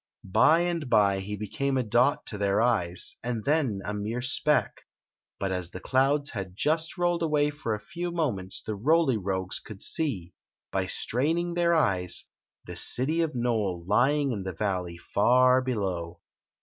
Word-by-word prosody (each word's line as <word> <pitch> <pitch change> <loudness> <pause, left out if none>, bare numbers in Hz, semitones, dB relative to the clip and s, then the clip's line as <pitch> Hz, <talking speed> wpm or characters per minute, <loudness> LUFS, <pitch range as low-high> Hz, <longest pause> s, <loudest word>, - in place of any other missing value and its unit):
By 110 - +4
and 170 -5 -2
by 100 -4 +4
he 105 +2 -5
became 135 +7 -2
a 130 - +1
dot 120 +5 +2
to 105 - -4
their 100 0 +2
eyes 100 -7 0
and 115 -3 -3
then 140 -10 +1
a 100 - -3
mere 110 +4 -3
speck; 145 +3 +1 0.6
but 95 -1 -1
as 90 -2 -3
the 95 - -8
clouds 140 +5 +1
had 95 -5 -6
just 160 - +1
rolled 175 -1 +1
away 150 -2 +2
for 135 -7 -3
a - - -7
few 175 +8 -5
moments 120 - -2
the 110 - -3
Roly 135 +4 +2
Rogues 95 -2 -3
could 105 -3 -9
see, 100 - -2 0.4
by 95 -1 -1
straining 165 - 0
their 170 0 +2
eyes, 95 - 0 0.4
the - - -8
city 155 +7 0
of 160 -4 -1
Nole 110 -8 -1
lymg 135 +6 +2
in 100 - -4
the 95 0 -5
valley 90 -2 -2
far 125 +8 +3
below. 95 -9 -3
120 Hz, 165 wpm, -27 LUFS, 95-150 Hz, 0.6 s, By